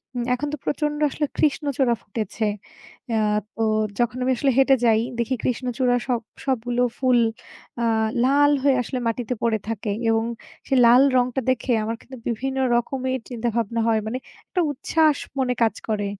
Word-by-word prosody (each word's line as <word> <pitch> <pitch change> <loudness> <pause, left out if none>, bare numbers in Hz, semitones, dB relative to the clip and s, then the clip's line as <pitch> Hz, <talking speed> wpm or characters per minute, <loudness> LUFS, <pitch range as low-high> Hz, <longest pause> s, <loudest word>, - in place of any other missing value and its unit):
উম 245 - -1
এখন 265 +4 -2
তো 300 - -2
প্রচন্ড 295 0 -1
আসলে 295 +2 -1
কৃষ্ণচূড়া 280 -4 +1
ফুটেছে। 215 +1 -3 0.6
অ্যা 220 -1 +2 0.3
তো 225 - -1 0.4
যখন 240 +1 +1
আমি 260 - +2
আসলে 275 +1 +2
হেঁটে 270 0 +6
যাই, 220 -1 +4 0.2
দেখি 235 +3 0
কৃষ্ণচূড়া 250 0 0
সব 245 -3 0 0.2
সবগুলো 245 -2 0 0.2
ফুল 255 -2 +3 0.6
আ - - +2 0.4
লাল 290 +2 +4
হয়ে 280 -2 +4
আসলে 255 +2 -4
মাটিতে 235 +1 -2
পড়ে 225 -2 +2
থাকে। 220 -1 -3 0.2
এবং 225 0 +2 0.4
সেই 270 - +2
লাল 245 +2 +7 0.2
রংটা 250 +1 +1
দেখে 250 0 0
আমার 225 +1 -2
কিন্তু 260 0 -11
বিভিন্ন 265 +3 -2 0.2
রকমের 260 +2 -1
চিন্তা 240 -1 -3
ভাবনা 230 0 0
হয়। 225 -1 +3
মানে 245 +4 -2 0.3
একটা 360 - -1
উচ্ছ্বাস 305 +2 +2 0.2
মনে 250 -1 +1
কাজ 225 - +2
করে। 205 -2 0
আ - - -55
250 Hz, 165 wpm, -23 LUFS, 230-270 Hz, 0.6 s, লাল